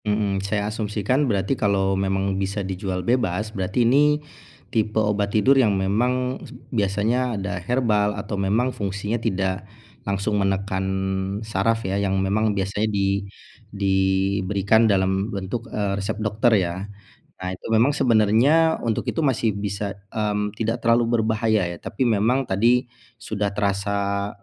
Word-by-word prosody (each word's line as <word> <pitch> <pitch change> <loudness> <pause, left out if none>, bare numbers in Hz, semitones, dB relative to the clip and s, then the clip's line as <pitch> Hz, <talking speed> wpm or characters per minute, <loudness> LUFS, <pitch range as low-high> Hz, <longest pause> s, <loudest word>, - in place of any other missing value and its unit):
Mhm, 105 -2 0
saya 100 +1 -1
asumsikan, 110 +6 0
berarti 100 +3 0
kalau 100 -5 +1
memang 95 0 0
bisa 100 +1 -2
dijual 95 -1 -3
bebas, 110 -3 0
berarti 95 +5 0
ini 145 +5 +4 0.6
tipe 110 -1 0
obat 105 -1 +1
tidur, 110 +6 +4
yang 105 -5 +2
memang 125 +7 0 0.3
biasanya 110 +3 0
ada 100 -2 -4
herbal, 105 -2 +1
atau - - -5
memang 105 +6 +1
fungsinya 100 +3 -3
tidak 95 -2 -2 0.3
langsung 100 +1 -1
menekan 95 -1 -1 0.6
syaraf, 110 +2 0
ya. 95 +1 0
Yang 95 -1 0
memang 100 +2 +1
biasanya 100 +3 -1
di 100 -1 0 0.4
diberikan 100 +2 +2
dalam 95 +1 +1
bentuk, 100 +4 -4
eee, 100 -2 -1
resep 105 +2 -3
dokter, 110 +2 +1
ya. 85 -2 -1 0.7
Nah, 95 - -4
itu - - -12
memang 115 +6 +4
sebenarnya, 125 +8 +4
untuk 115 -2 -1
itu 165 - 0
masih 115 -6 +1
bisa, 100 0 -3 0.2
mmm, 105 -1 -1
tidak 115 +1 -1
terlalu 115 +1 +4
berbahaya, 110 -2 +1
ya. - - -7
Tapi 130 - -2
memang 120 +4 +2
tadi 120 +4 +2 0.3
sudah 105 -2 -2
terasa 100 0 -1
105 Hz, 140 wpm, -23 LUFS, 100-115 Hz, 0.7 s, ini